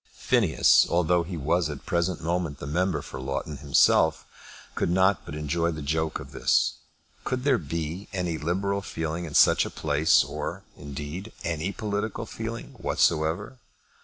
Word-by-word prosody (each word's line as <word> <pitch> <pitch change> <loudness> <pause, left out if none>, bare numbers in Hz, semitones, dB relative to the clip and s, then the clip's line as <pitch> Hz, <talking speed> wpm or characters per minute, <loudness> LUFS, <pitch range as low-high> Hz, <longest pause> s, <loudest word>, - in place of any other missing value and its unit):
Phineas, - - +4
although 85 0 +2
he 85 +1 -5
was 80 +3 +1
at 75 - -4
the - - -18
present 85 -1 -1
moment 85 -3 -1
the 70 - -7
member 85 +1 0
for - - -8
Loughton 70 +3 -4
himself, 70 -2 +3 0.5
could - - -1
not 95 +1 +3
but 75 - -6
enjoy 80 +3 0
the 75 -3 -5
joke 80 +2 -1
of - - -10
this. - - +2 0.5
Could 125 -1 -2
there 135 -4 +3
be 85 +4 -4
any 90 -4 -2
liberal 100 +5 -1
feeling 80 -1 -4
in 75 - -7
such - - +6
a - - -4
place, 75 +1 +3
or, - - -5
indeed, 75 +9 -7
any 80 +2 -1
political 105 +2 -3
feeling 115 +1 -6
whatsoever? 85 +10 0
85 Hz, 160 wpm, -26 LUFS, 75-95 Hz, 0.5 s, such